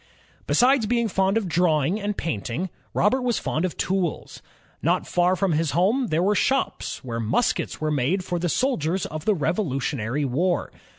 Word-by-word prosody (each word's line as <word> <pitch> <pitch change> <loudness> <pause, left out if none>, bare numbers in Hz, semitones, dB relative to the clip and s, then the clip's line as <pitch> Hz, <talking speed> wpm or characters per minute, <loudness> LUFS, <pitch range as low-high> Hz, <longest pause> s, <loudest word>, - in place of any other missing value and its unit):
Besides 255 -2 +4
being 235 0 +1
fond 195 +1 +1
of 215 -4 -1
drawing 170 +2 +1
and 205 0 -2
painting, 160 - -3 0.2
Robert 255 +6 +2
was 245 -2 0
fond 160 +4 -1
of 180 - -4
tools. 185 -3 -2 0.4
Not - - +1
far 180 +1 +2
from 195 -1 0
bis 160 0 +1
home, 225 +9 +2
there 165 -1 +1
were 205 +2 +3
shops 265 +7 -1
where 115 -3 -4
muskets 115 - 0
were 155 0 -1
made 150 +7 0
for 175 -2 -2
the 175 +1 -1
soldiers 185 - 0
of 155 0 -6
the 215 - +3
Rev 165 +1 0
olutionary 140 - -1
War. 170 +8 0
180 Hz, 175 wpm, -24 LUFS, 155-210 Hz, 0.4 s, Besides